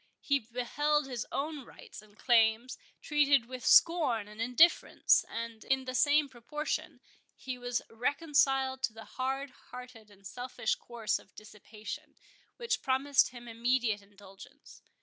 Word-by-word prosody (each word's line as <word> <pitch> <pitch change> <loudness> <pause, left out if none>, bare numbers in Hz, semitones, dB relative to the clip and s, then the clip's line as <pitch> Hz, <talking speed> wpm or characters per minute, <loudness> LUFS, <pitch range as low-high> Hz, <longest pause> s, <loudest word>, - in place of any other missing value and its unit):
He 280 -1 +1
beheld 270 +6 -1
his 250 -3 -5
own 295 0 -3
rights 235 - -13
and 215 0 -22
claims 230 0 +2 0.3
treated 285 -4 +3
with 255 +1 -8
scorn 280 -11 +4
and 210 +1 -9
indifference; 250 +9 +4
and, 230 -1 -6
in 265 0 0
the 255 - -5
same 290 +3 +3
proportion, 275 +4 -5 0.3
he 255 -1 -6
was 245 0 -2
reconciled 270 +1 +1
to 250 -4 -1
the 220 -1 -11
hard 265 +1 -3 0.2
hearted 250 -4 -11
and 200 -1 -20
selfish 245 +2 -3
course 235 -3 -3
of 190 - -22
dissipation, 215 0 -10 0.4
which 470 -1 -1
promised 275 +1 +2
him 240 -1 -12
immediate 230 -2 0
indulgence. 200 -1 -16
250 Hz, 135 wpm, -31 LUFS, 225-275 Hz, 0.4 s, scorn